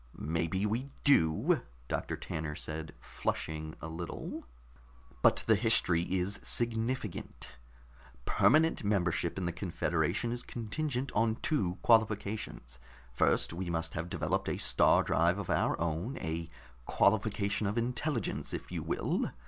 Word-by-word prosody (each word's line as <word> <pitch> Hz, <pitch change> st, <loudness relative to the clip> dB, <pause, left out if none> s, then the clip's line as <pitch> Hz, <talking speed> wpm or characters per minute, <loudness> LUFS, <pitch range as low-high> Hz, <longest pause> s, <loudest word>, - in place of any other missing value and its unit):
"Maybe 85 Hz, +5 st, -1 dB
we 120 Hz, +6 st, -1 dB
do," 80 Hz, -, +4 dB, 0.3 s
Doctor -, -, -2 dB
Tanner 75 Hz, -1 st, -4 dB
said, 80 Hz, +1 st, -6 dB
flushing 80 Hz, 0 st, -3 dB
a 80 Hz, -, -5 dB
little. 85 Hz, +1 st, -6 dB, 0.7 s
"But -, -, +4 dB
the -, -, +5 dB
history 85 Hz, 0 st, +3 dB
is 95 Hz, +3 st, -2 dB
significant. 115 Hz, -2 st, -2 dB, 0.8 s
Permanent 160 Hz, -2 st, +4 dB
membership 90 Hz, -4 st, 0 dB
in 95 Hz, -, -2 dB
the 85 Hz, -, 0 dB
confederation 85 Hz, +3 st, -1 dB
is 120 Hz, 0 st, -3 dB
contingent 125 Hz, +3 st, -3 dB
on 110 Hz, +1 st, +2 dB
two 95 Hz, -, +1 dB
qualifications. 105 Hz, -, +1 dB, 0.3 s
First, 60 Hz, -, +2 dB
we 90 Hz, +1 st, -4 dB
must 80 Hz, -1 st, -2 dB
have 85 Hz, +3 st, -4 dB
developed -, -, -1 dB
a -, -, -1 dB
star -, -, +4 dB
drive 85 Hz, +4 st, +2 dB
of 100 Hz, -4 st, -3 dB
our -, -, +1 dB
own, 85 Hz, -, -2 dB
a 80 Hz, +1 st, -3 dB, 0.4 s
qualification 105 Hz, 0 st, +2 dB
of 105 Hz, +4 st, -2 dB
intelligence, 120 Hz, 0 st, -1 dB
if -, -, -8 dB
you -, -, -3 dB
will. -, -, -1 dB
95 Hz, 130 wpm, -32 LUFS, 80-115 Hz, 0.8 s, the